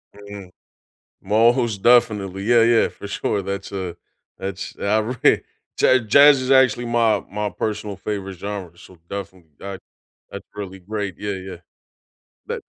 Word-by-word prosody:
Mm. 100 -2 -11 0.7
Most 115 +1 +2
definitely. 105 -6 +3
Yeah, 120 +1 +5
yeah, 115 0 +4
for - - -10
sure. 100 0 -2
That's 100 +1 -5
a 95 -3 -4 0.4
that's 95 0 -5
outra 110 +4 +1 0.4
Ja 130 - +5
jazz 140 +5 +6
is 130 0 -3
actually 130 -3 +4
my 115 -2 +2
my 105 +1 -2
personal 105 -1 -4
favorite 95 -1 -5
genre, 100 -3 -6
so 90 -1 -16
definitely 95 -4 -8
that 100 -2 -7 0.5
that's - - -9
really 95 -2 -7
great, 100 -1 -4
yeah, 105 0 -3
yeah. 95 -1 -7 0.9
That - - -4
105 Hz, 135 wpm, -21 LUFS, 95-115 Hz, 0.9 s, jazz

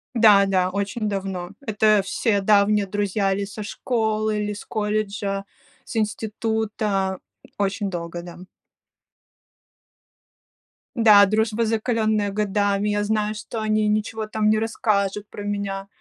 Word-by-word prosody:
Да, 210 -4 +6
да, 185 -2 +1
очень 200 +3 -2
давно. 190 -3 -4
Это 215 -3 +3
все 200 +2 0
давние 205 0 +3
друзья 200 0 0
или 200 +1 -1
со 210 +2 -7
школы, 215 -1 -1
или 210 0 -2
с 205 - -9
колледжа, 210 -2 -2 0.4
с - - -9
института. 215 -3 -1 0.4
Очень 200 0 -1
долго, 170 -1 -5
да. 175 0 -10 2.6
Да, 215 -3 +7
дружба, 220 +2 +1
закаленная 220 -2 0
годами. 205 0 0
Я 205 0 0
знаю, 215 0 0
что 220 +1 -6
они 215 0 +1
ничего 215 +1 -1
там 215 0 +1
не 215 0 +3
расскажут 210 -3 0
про 205 - -8
меня, 200 -1 -3
210 Hz, 125 wpm, -23 LUFS, 200-215 Hz, 2.6 s, Да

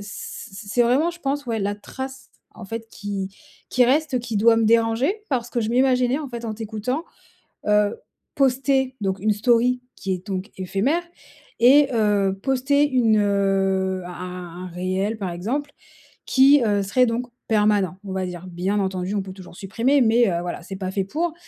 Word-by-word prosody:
c 205 +1 -8
c 200 +1 -9
c'est 240 - +3
vraiment 265 +8 +3
je 345 0 -13
pense, 280 -1 -2
ouais, 230 -2 -1
la 205 0 -1
trace 265 +5 -8 0.2
en - - -10
fait 225 +3 -6
qui 200 -2 -4 0.4
qui 255 - +4
reste 270 +1 +2
qui 235 -3 -4
doit 225 +2 +5
me 225 - +2
déranger. 230 - +3
Parce 245 -3 -1
que 240 - -1
je 220 - -1
m'imaginais 255 +1 +3
en 295 - -5
fait 235 -1 -7
en 220 -2 -3
t'écoutant, 225 +8 -3 0.6
heu, 210 0 +3 0.4
poster 265 0 +2
donc 195 -1 -1
une 215 +3 +1
story 245 +3 +2
qui 195 -2 -3
est 185 +2 -7
donc 195 +2 -4
éphémère 195 - 0 0.6
et 275 +4 +7
heu, 205 -3 +2
poster 275 +2 +2
une, 230 -5 +3
heu, 195 -2 +1
un - - -7
un 180 -1 -7
un - - -6
réel 185 +5 -2
par 190 -4 -3
exemple, 255 +12 -3 0.6
qui, 275 0 +6
heu, 205 -2 +2
serait 250 +6 +3
donc 235 +2 -2 0.2
permanent, 210 -4 +2
on 190 - -6
va 190 -1 -2
dire. 180 0 -7
Bien 185 +4 -1
entendu, 190 0 -2
on 200 - 0
peut 190 0 -8
toujours 185 -2 -12
supprimer, 230 +9 +1
mais, 235 -1 +4
heu, 170 - -1
voilà, 175 0 -5
c'est 195 +2 -7
pas 190 -1 -4
fait 195 -1 0
pour 325 - -2
220 Hz, 185 wpm, -23 LUFS, 195-255 Hz, 0.6 s, et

